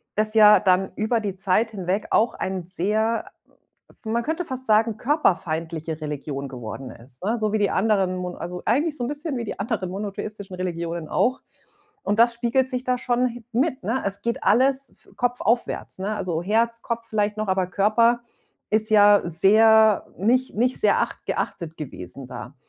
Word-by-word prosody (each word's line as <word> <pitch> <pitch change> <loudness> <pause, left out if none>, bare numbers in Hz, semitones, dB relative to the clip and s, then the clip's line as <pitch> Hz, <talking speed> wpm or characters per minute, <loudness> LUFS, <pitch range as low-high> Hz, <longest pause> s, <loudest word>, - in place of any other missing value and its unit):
das 215 0 0
ja 210 -1 +7
dann 190 0 +2
über 220 +2 0
die 195 -3 -4
Zeit 200 +4 +1
hinweg 195 0 -2
auch 230 - +3
ein 185 -2 -4
sehr 215 +6 0 0.8
man 230 +2 -1
könnte 320 +5 -2
fast 260 -3 -6
sagen 220 0 +3
körperfeindliche 165 - -1
Religion 145 -2 -4
geworden 125 +1 -7
ist, 125 +5 -9
ne, 225 +5 0
so 215 -1 -1
wie - - +3
die 205 -1 +2
anderen 190 -3 +1
mo 180 0 -4
also, 180 +1 -6
eigentlich 295 +7 +1
so 245 - -3
'n - - -3
bisschen 290 0 -3
wie 235 - -3
die - - -6
anderen 200 -3 -2
monotheistischen 200 0 -6
Religionen 170 -2 -4
auch. 255 +10 +1 0.6
Und 205 +2 0
das 235 +1 +5
spiegelt 240 +2 0
sich 255 0 -3
da 255 -1 0
schon 245 0 +1
hi 240 -1 -8
mit, 260 +3 0
ne? 240 +5 -1
Es 200 0 -3
geht 235 0 -2
alles 265 +4 +3
f - - -15
kopfaufwärts, 245 -4 -1
ne? 200 +3 -2
Also, 170 -5 -2
Herz, 230 +3 +1
Kopf 230 0 -4
vielleicht 210 -1 -1
noch, 215 - -2
aber 190 -1 +1
Körper 230 +5 +2 0.5
ist 215 0 +1
ja 205 -1 +6
sehr 215 +5 +5
nicht 250 +6 +1
nicht 250 +3 +1
sehr - - +4
acht - - -3
geachtet 165 -3 -4
gewesen 130 - -8
da. 125 +2 -9
215 Hz, 175 wpm, -23 LUFS, 185-235 Hz, 0.8 s, ja